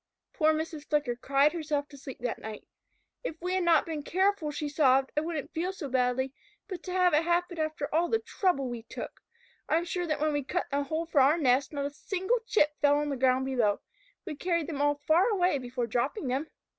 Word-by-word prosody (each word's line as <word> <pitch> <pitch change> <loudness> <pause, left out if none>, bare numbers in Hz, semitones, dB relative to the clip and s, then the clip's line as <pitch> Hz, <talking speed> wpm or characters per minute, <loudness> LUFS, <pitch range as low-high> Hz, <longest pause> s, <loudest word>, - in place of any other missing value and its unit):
Poor 310 -1 +3
Mrs. 315 -1 -3
Flicker 290 -5 +1
cried 275 +4 +2
herself 300 -3 -2
to 290 - -14
sleep 270 -1 -9
that 245 -2 -2
night. 215 -1 -8 0.6
"If 415 - -4
we 360 +1 -2
had 375 -1 +1
not 335 -3 +4
been 315 -3 -4
careful," 375 0 +1
she 295 0 -3
sobbed, 270 -3 +3
"I 300 - +2
wouldn't 315 -2 -4
feel 350 +4 -1
so 340 -7 -6
badly, 255 +1 +1 0.3
but 370 -5 -6
to 365 - -5
have 365 -2 +3
it 300 - +5
happen 345 0 0
after 310 -2 -2
all 335 +2 +2
the 450 - +3
trouble 360 - 0
we 240 -2 -5
took! 225 - -8 0.5
I - - +3
am 340 - -1
sure 355 0 -2
that 305 - -1
when 305 0 +1
we 290 -1 0
cut 350 +7 -2
the 280 +1 +1
hole 315 +4 -2
for 315 -4 +3
our 285 +5 +5
nest, 265 -3 +2
not 285 -2 -2
a 285 - -3
single 380 +9 -1
chip 300 -11 +3
fell 290 0 +4
to - - -3
the - - -1
ground 260 0 +2
below. 235 -6 +1 0.5
We 320 -5 -5
carried 335 +1 0
them 285 -3 -4
all 290 0 +3
far 315 +8 +3
away 360 -8 +2
before 245 -1 -3
dropping 250 - -1
them. 270 +5 -1
300 Hz, 225 wpm, -29 LUFS, 270-340 Hz, 0.6 s, it